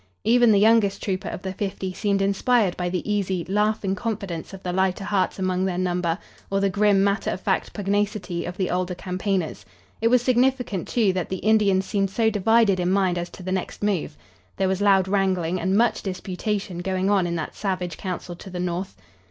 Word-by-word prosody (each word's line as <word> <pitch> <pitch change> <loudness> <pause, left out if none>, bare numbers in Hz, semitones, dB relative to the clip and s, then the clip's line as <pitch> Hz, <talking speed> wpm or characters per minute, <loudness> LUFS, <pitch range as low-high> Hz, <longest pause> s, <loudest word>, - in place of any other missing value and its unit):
Even 240 +1 +5
the 205 - +5
youngest 215 -1 +3
trooper 190 -2 -2
of - - -7
the 190 -1 -3
fifty 190 -1 -4
seemed 200 0 0
inspired 200 0 +2
by 180 -1 -2
the 180 +2 -3
easy, 190 -4 -1
laughing 210 0 +1
confidence 195 -5 -4
of 195 -1 -10
the 180 - -2
lighter 190 +1 +1
hearts 195 -1 0
among 185 -1 0
their 185 -2 -1
number, 180 -2 0 0.3
or 195 - +1
the 195 -1 +1
grim, 200 0 +3
matter 200 0 +1
of - - -3
fact 190 0 -1
pugnacity 200 -3 -1
of 175 +1 -6
the 185 - -1
older 180 0 -1
campaigners. 185 - -2 0.4
It 225 - +3
was 245 +1 +4
significant, 250 -6 +1
too, 215 -6 +2
that 180 -3 -2
the 190 - -2
Indians 205 -3 +3
seemed 195 0 0
so 220 +3 +1
divided 210 -1 +3
in 180 0 +1
mind 190 -2 +2
as 175 0 -4
to 185 - -11
the 185 - -4
next 185 +2 -3
move. 190 - -1 0.4
There 190 - +1
was 190 +1 -1
loud 195 -2 +4
wrangling 185 -3 0
and 190 +3 +1
much 235 +1 +2
disputation 190 0 -3
going 190 +2 0
on 190 -3 +3
in 170 - -2
that 160 - -4
savage 185 -4 -2
council 180 -2 -5
to 190 - -10
the 180 -1 -6
north. 180 +2 -3
190 Hz, 200 wpm, -24 LUFS, 180-205 Hz, 0.4 s, Even